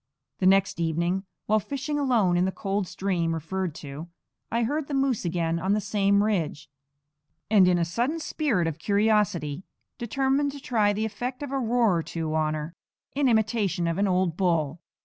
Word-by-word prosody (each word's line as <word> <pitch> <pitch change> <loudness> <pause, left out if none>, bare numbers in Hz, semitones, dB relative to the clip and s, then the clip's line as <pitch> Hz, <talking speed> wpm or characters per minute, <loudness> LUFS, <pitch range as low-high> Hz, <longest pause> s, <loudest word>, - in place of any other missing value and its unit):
The 185 - +3
next 195 0 +3
evening, 170 +4 0 0.2
while 215 +1 +3
fishing 280 +7 -3
alone 230 -10 +2
in 175 +1 +3
the 190 - 0
cold 195 -1 -2
stream 180 -3 -1
referred 165 +1 -3
to, 145 +4 -7 0.4
I 235 +1 +1
heard 290 +5 -1
the 285 - -3
moose 270 -7 +1
again 170 -1 0
on 190 +4 +1
the 210 - +2
same 200 -1 +2
ridge; 160 -8 -2 0.8
and 195 -4 +6
in 180 -1 +4
a 170 - +1
sudden 240 - -1
spirit 275 - 0
of 165 -1 -3
curiosity 200 -7 +1 0.4
determined 270 +4 0
to 285 - -8
try 220 -6 +1
the 215 +2 -1
effect 245 +6 -4
of 285 - -5
a 275 - 0
roar 230 -6 +2
or - - 0
two 160 -1 -4
on 155 -1 +1
her, 155 +2 -5 0.4
in 280 -2 +3
imitation 215 -6 +1
of 170 +2 -1
an 200 - +2
old 180 -3 +1
bull. 165 -4 0
195 Hz, 185 wpm, -26 LUFS, 170-230 Hz, 0.8 s, and